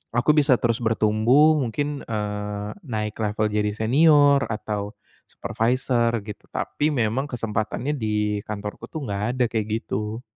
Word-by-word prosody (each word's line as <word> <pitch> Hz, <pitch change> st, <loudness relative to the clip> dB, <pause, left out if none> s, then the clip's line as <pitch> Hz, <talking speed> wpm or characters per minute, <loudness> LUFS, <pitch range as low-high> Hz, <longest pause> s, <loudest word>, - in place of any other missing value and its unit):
aku 120 Hz, +5 st, +4 dB
bisa 145 Hz, -3 st, +5 dB
terus 115 Hz, 0 st, 0 dB
bertumbuh 115 Hz, +7 st, +4 dB
mungkin, 145 Hz, +4 st, -2 dB
eee, 105 Hz, -1 st, -3 dB
naik 110 Hz, -6 st, -3 dB
level 110 Hz, 0 st, 0 dB
jadi 105 Hz, 0 st, 0 dB
senior 145 Hz, +4 st, +5 dB
atau 105 Hz, -1 st, -4 dB, 0.4 s
supervisor 120 Hz, 0 st, 0 dB
gitu 105 Hz, -1 st, -9 dB
tapi 150 Hz, -, -1 dB
memang 125 Hz, -1 st, 0 dB
kesempatannya 115 Hz, +3 st, -2 dB
di 105 Hz, -3 st, -1 dB
kantorku 105 Hz, 0 st, -6 dB
tuh, 155 Hz, -3 st, -6 dB
nggak 100 Hz, -2 st, -3 dB
ada 125 Hz, -, +3 dB
kayak 110 Hz, -2 st, -1 dB, 0.2 s
gitu. 105 Hz, +3 st, -4 dB
110 Hz, 135 wpm, -24 LUFS, 105-130 Hz, 0.4 s, bisa